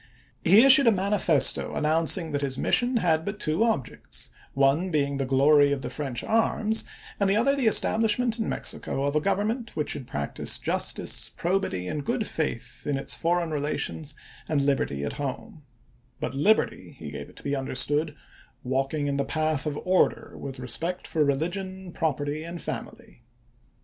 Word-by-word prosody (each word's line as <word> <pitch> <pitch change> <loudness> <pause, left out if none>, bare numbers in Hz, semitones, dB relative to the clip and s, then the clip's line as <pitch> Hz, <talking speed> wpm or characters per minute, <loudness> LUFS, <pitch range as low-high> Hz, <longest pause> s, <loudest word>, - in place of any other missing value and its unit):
He 200 +7 +7
issued 270 -1 +8
a - - +8
manifesto 195 -6 +2
announcing 160 +2 +2
that 145 -1 -1
his 135 -2 -2
mission 245 0 +2
had 160 -6 +2
but 200 +3 -5
two 155 +6 +1
objects, 225 - -3 0.2
one 140 +7 +2
being 140 -4 0
the 135 -1 -2
glory 140 +2 +5
of 135 -2 -2
the 125 - -5
French 135 -6 -4
arms, 220 0 +1 0.4
and 200 -1 +2
the 195 - +3
other 265 +6 +3
the 265 -5 +1
estab 220 0 +4
lishment 230 +2 +1
in 220 - -1
Mexico 135 - -3
of 140 +1 -1
a 150 - +3
government 215 - -1
which 150 - -1
should 130 -4 -5
practice 70 0 -1
justice, - - -1
probity, 170 - -2
and 145 +8 -3
good 235 - -1
faith 120 - -4
in 145 -2 0
its 135 - -3
for 175 +1 +1
eign 165 -2 -4
relations 150 0 -3 0.3
and 150 -3 +2
liberty 135 - 0
at 70 - -3
home; 155 - -5 0.3
" 125 +1 -36
but - - -3
liberty," 200 +11 +1
he - - -8
gave - - -7
it - - -18
to - - -13
be 140 0 -1
understood, 145 +3 -1 0.3
" - - -28
walking 135 +3 -1
in 140 -1 -1
the 140 - +1
path 155 -1 -1
of 145 -1 -3
order, 185 0 +1
with 135 -1 -7
respect 165 +9 -2
for 155 - +1
religion, 180 +6 -2
property, 150 -2 -2
and 170 +1 -7
family." 225 - -7
155 Hz, 180 wpm, -26 LUFS, 140-200 Hz, 0.4 s, issued